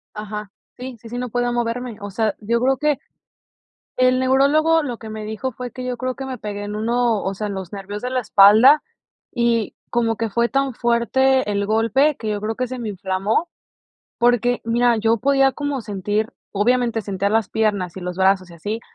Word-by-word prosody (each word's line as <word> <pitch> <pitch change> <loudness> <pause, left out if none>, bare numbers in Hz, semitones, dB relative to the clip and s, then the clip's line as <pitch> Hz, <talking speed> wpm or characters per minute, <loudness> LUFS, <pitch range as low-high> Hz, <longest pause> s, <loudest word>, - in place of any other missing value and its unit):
Ajá. 210 -1 -6 0.3
Sí, 250 -1 -7
sí, 230 - -11
sí, 245 - -5
no 250 -1 -3
podía 245 +1 0
moverme. 240 -1 -2
O 205 - -5
sea, 215 +1 -1
yo 230 +2 0
creo 265 +1 +2
que, 300 -2 +1 1.0
el 255 0 +3
neurólogo 290 +5 +3
lo 245 -6 -4
que 220 - -10
me 215 0 -6
dijo 220 +5 -4
fue 250 +1 -7
que 255 0 -7
yo 250 -1 -3
creo 255 0 -3
que 270 - -6
me 260 -1 -6
pegué 205 -1 -5
en 205 0 -5
uno, 230 0 +1
o 195 - -2
sea, 210 - -4
en 200 - -4
los 190 -2 -6
nervios 205 +1 -6
de 250 - -3
la 255 -1 0
espalda 220 +9 +7 0.5
y 235 -2 0 0.2
como 230 -2 +1
que 225 -2 -2
fue 235 +2 +1
tan 275 -1 0
fuerte 240 +1 +2
el 200 0 -1
golpe, 245 +7 +2
que 220 - -6
yo 205 -1 -2
creo 220 +1 -2
que 255 -1 -2
se 255 0 -6
me 225 - -4
inflamó, 195 - -1 0.7
porque 245 0 +2
mira, 235 +1 +2
yo 225 +1 +2
podía 270 +1 +3
como 285 -4 -3
sentir, 210 +3 -2 0.2
obviamente, 230 +2 +1
sentía 200 0 -1
las 220 -1 0
piernas 200 -5 -1
y - - -7
los 180 0 -5
brazos 190 -1 +2
y 170 - -12
así, 210 +7 -4
230 Hz, 205 wpm, -21 LUFS, 210-255 Hz, 1.0 s, espalda